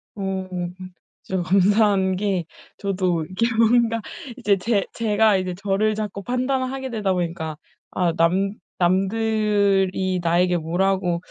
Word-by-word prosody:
어 195 -2 -3 0.7
진짜 190 -1 -3
감사한 195 0 +3
게 190 -3 -1 0.3
저도 185 -5 -1
이렇게 185 +7 -1
뭔가 230 0 +3 0.4
이제 210 -6 +2
제 200 +1 0
제가 215 -2 +3
이제 185 -1 -2
저를 205 +3 0
자꾸 205 -2 -4
판단을 255 +2 -1
하게 265 -1 -5
되다 210 -5 -1
보니까 165 -3 -3 0.3
아 175 -2 0
'남 185 +4 +1 0.2
남들이 195 -1 +1
나에게 175 +1 +2
뭐라고 175 +1 0
195 Hz, 245 characters per minute, -22 LUFS, 180-215 Hz, 0.7 s, 감사한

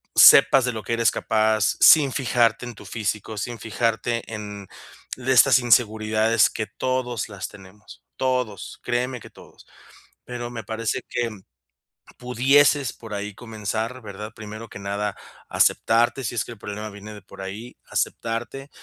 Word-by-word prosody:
sepas 135 - +8
de 125 - 0
lo 110 -2 -6
que 115 - -3
eres 115 -1 +3
capaz, 110 -1 +1
sin 145 -4 +7
fijarte 120 -3 +1
en 120 - -8
tu - - -13
físico, 110 -1 -3
sin 120 +3 -4
fijarte 115 +1 -1
en 105 -2 -7 0.5
de 130 +1 -2
estas 125 +1 +7
inseguridades 110 -2 +3
que, 110 - -4
todos 125 -4 -2
las 100 -2 -6
tenemos, 100 +2 -15
todos, 125 -5 -2
créeme 125 +1 -1
que - - -12
todos. - - -17 0.6
Pero 120 -1 -5
me 115 -2 -6
parece 110 +1 -3
que 120 -1 -1 0.9
pudieses 135 +2 +3
por 110 -2 -10
ahí 100 0 -5
comenzar, 110 +2 -4
¿verdad? 105 +1 -8
Primero 110 +1 -9
que - - -10
nada, 100 +1 -3 0.3
aceptarte, 120 +4 +2
si 120 - -3
es - - -1
que - - -10
el 105 - -17
problema 105 +1 -6
viene 105 +1 -10
de 105 - -11
por - - -12
ahí, 105 +6 -8
aceptarte, 120 +5 -3
115 Hz, 155 wpm, -23 LUFS, 105-120 Hz, 0.9 s, sepas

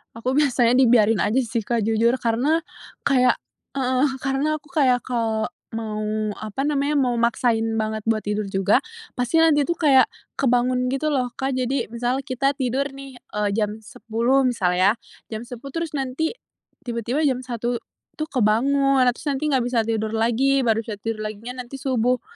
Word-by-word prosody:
Aku 255 +4 -1
biasanya 250 -4 +3
dibiarin 230 -4 +5
aja 240 +8 +2
sih 230 -2 -3
Kak, 235 -2 0
jujur. 225 +3 +2
Karena, 255 +8 +1 0.4
kayak 255 -2 +4 0.4
heeh, 260 0 +1 0.2
karena 285 +3 0
aku 300 - -22
kayak 260 -4 +3
kalau 225 -3 -1 0.2
mau, 215 -1 -3 0.3
apa 215 +5 -5
namanya, 290 0 0
mau 250 -4 +1
maksain 230 -1 +1 0.2
banget 215 0 -3
buat 220 -1 +1
tidur 210 0 -2
juga, 195 +3 +2 0.4
pasti 250 +7 +2
nanti 295 -3 +4
tuh 340 - 0
kayak 275 -6 +5 0.3
kebangun 250 -1 +2
gitu 305 +3 0
loh 250 -4 -1
Kak, 265 0 -2
jadi 255 -1 -1
misal 245 +3 -1
kita 275 +1 0
tidur 265 +1 -1
nih, 275 -2 -10
e 240 -4 -8 0.2
jam 215 0 -1
10.00 245 +3 0
misal 180 -8 +1
ya, 195 +3 +5 0.4
jam 220 - -4
10.00 245 +3 -9
terus 305 -3 -3
nanti 270 +4 -1 0.6
tiba-tiba 240 +6 -1
jam 255 -2 +1
1.00 240 -1 -3 0.3
tuh 310 0 -5
kebangun, 270 +4 +2
terus 245 - -5
nanti 290 +1 0
nggak 260 -4 +2
bisa 245 -2 +1
tidur 220 -1 -2
lagi, 245 +5 +2
baru 225 -2 +1
bisa 220 - -4
tidur 220 -1 -3
laginya 240 +4 -6
nanti 270 +2 -9
subuh 250 -2 +1
245 Hz, 165 wpm, -23 LUFS, 225-270 Hz, 0.6 s, dibiarin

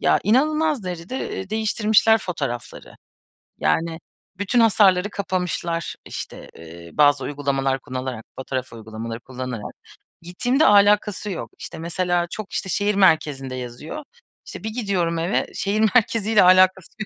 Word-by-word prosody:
Ya, - - +3
inanılmaz 300 +2 +2
derecede, 180 +8 -5
eee, 190 - -6
değiştirmişler 220 0 +3
fotoğrafları. 140 - -6 0.6
Yani 165 - 0 0.4
bütün 205 +5 +1
hasarları 205 -3 +4
kapamışlar. 180 -4 -2
İşte, - - -8
eee, 85 +1 -12
bazı 145 -3 +4
uygulamalar 135 -2 -1
kullanarak, 130 -3 -5
fotoğraf 130 -2 -4
uygulamaları 115 +1 -7
kullanarak, 125 -4 -6 0.5
gittiğimde 245 - +1
alakası 205 0 +4
yok. 180 - -5
İşte, 165 - -8
mesela 175 +1 -1
çok 215 -2 -6
işte, 190 - -3
şehir 205 +2 0
merkezinde 150 -8 +2
yazıyor. 130 - -7 0.4
İşte, - - -9
bir 220 - -2
gidiyorum 190 -8 -1
eve 175 +5 0
şehir 205 +2 -1 0.2
merkeziyle 225 -2 +3
alakası 185 0 +5
yo 215 - -3
180 Hz, 125 wpm, -22 LUFS, 135-210 Hz, 0.6 s, alakası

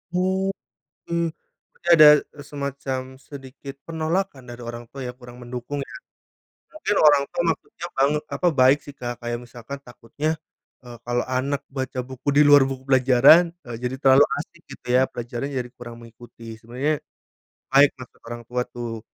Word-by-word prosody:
Oke, 190 +1 -1 1.0
berarti 175 - -10
ada, 155 -2 +9 0.4
semacam 140 -2 -4 0.2
sedikit 135 0 -10
penolakan 160 -3 -3
dari 120 0 -9
orang 120 0 -7
tua 135 - -8
ya, 125 - -4
kurang 125 -1 -12
mendukung 125 +4 -5
ya. - - -10 0.8
Mungkin 210 - 0
orang 145 -2 +6
tua 175 - -1
maksudnya 165 +1 -6
banget 145 +3 +2
apa, 180 - -1
baik 130 +2 +5
sih, 145 - -10
Kak, 120 -2 -6
kayak 120 0 -4
misalkan 120 +3 -9
takutnya, 145 +6 -4 0.5
eee, 120 -1 -9
kalau 120 0 -1
anak 130 +2 -2
baca 130 -2 -5
buku 130 +2 -8
di 150 - +8
luar 145 -1 +8
buku 130 0 -7
pelajaran, 135 +6 +6 0.2
eee, 120 -1 -6
jadi 125 +1 -2
terlalu 135 +1 +6 0.2
asik 170 +3 -8
gitu - - -12
ya, 130 - +6
pelajarannya 120 +4 -5
jadi 125 -1 -5
kurang 120 -1 -10
mengikuti. 115 0 -12
Sebenarnya, 135 +6 -2 0.7
baik 140 +1 +7
maksud 125 -1 -13
orang 120 0 -6
tua 125 0 -2
tuh. 115 -2 -6
130 Hz, 155 wpm, -23 LUFS, 120-145 Hz, 1.0 s, ada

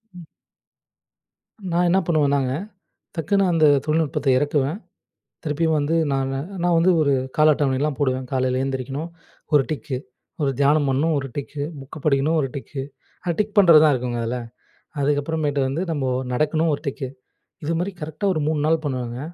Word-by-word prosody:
ம். 175 -2 -11 1.4
நான் 175 +1 +2
என்ன 185 +3 +4
பண்ணுவேன்னாங்க, 140 -5 +2 0.6
டக்குனு 195 +4 +1
அந்த 165 -2 +4 0.2
தொழில்நுட்பத்த 155 -2 0
எறக்குவேன். 145 +3 0 0.7
திருப்பியும் 160 +1 +1
வந்து 145 +3 0 0.2
நான் 135 0 0 0.3
நான் 175 -1 +3
வந்து 175 +3 +4
ஒரு 140 -2 +3 0.2
கால 155 0 +6
அட்டவணைலாம் 140 +1 0
போடுவேன். 130 -2 0
காலைல 130 0 +1
எழுந்திரிக்கணும், 135 +4 -3 0.4
ஒரு 145 - +6
டிக்கு. 150 -3 -3 0.5
ஒரு 140 - +2
தியானம் 145 0 +3
பண்ணணும், 145 +5 +1
ஒரு 135 - -4
டிக்கு. 145 0 -4 0.2
புக் 135 +4 -10
படிக்கணும், 150 +2 +2
ஒரு 135 - -1
டிக்கு. 135 0 -5 0.4
அத 175 - +1
டிக் 210 0 -2
பண்றதுதான் 155 -6 +7
இருக்குங்க 125 -1 -2
அதுல. 125 +2 -2 0.6
அதுக்கப்புறமேட்டு 145 0 0
வந்து 145 +6 -2
நம்ப 145 -5 -1 0.3
நடக்கணும் 155 +4 +1
ஒரு - - -6
டிக்கு. 135 -1 -3 0.6
இதுமாரி 165 +5 -1
கரெக்ட்டா 155 +6 -4
ஒரு 155 - -1
3 155 -2 0
நாள் 160 0 +2
பண்ணுவேங்க. 125 -3 -3
145 Hz, 145 wpm, -22 LUFS, 135-160 Hz, 1.4 s, பண்றதுதான்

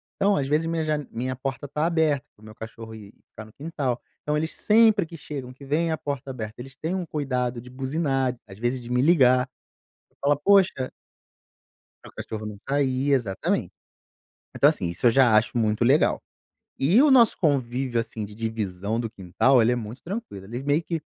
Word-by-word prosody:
então 200 +1 +2
às 135 -5 -1
vezes 150 +3 +1
minha 165 -1 -1
jane 150 -2 -2
minha 130 +3 -3
porta 135 +2 -4
está 150 +3 -1
aberta, 160 -5 +1
para - - -25
o - - -15
meu 110 0 -12
cachorro 110 0 -9
ir 105 -1 -12 0.2
ficar 110 - -10
no 110 - -17
quintal. 140 -4 -3 0.2
Então 150 - -1
eles 160 +2 -3
sempre 215 -3 +4
que 165 - -11
chegam, 135 -4 -7
que 140 +2 -14
veem 160 +4 0
a 160 - -1
porta 140 -3 -5
aberta, 110 -3 -7
eles 135 +1 -11
têm 160 +6 -3
um 185 -2 -2
cuidado 125 -6 -2
de 125 - -13
buzinar, 135 0 -1
às 95 -1 -12
vezes 120 +3 -1
de 120 - -10
me 125 0 +2
ligar. 130 -5 +5 0.7
Falar: 145 +1 +3
"Poxa" 185 -5 +3 1.1
para - - -11
o - - -36
cachorro 110 -1 -6
não 105 -1 -7
sair, 140 0 +1
exatamente. 115 -8 -1 0.8
Então - - +6
assim, - - -2
isso 85 +8 +1
eu - - +6
já 120 -3 +5
acho 110 +3 +2
muito 110 0 +1
legal. 135 +6 +3 0.6
E 170 - +4
o 300 - +5
nosso 240 -4 +6
convívio, 130 -5 0
assim, 115 -1 -5
de 105 0 -10
divisão 110 -2 -3
do 115 -2 -3
quintal, 110 +7 +2
ele 115 +2 +3
é - - 0
muito 115 +2 -7
tranquilo. 180 - -6
Eles 120 +5 -6
meio 145 +3 +2
que, 165 -1 -3
130 Hz, 200 wpm, -25 LUFS, 115-150 Hz, 1.1 s, Então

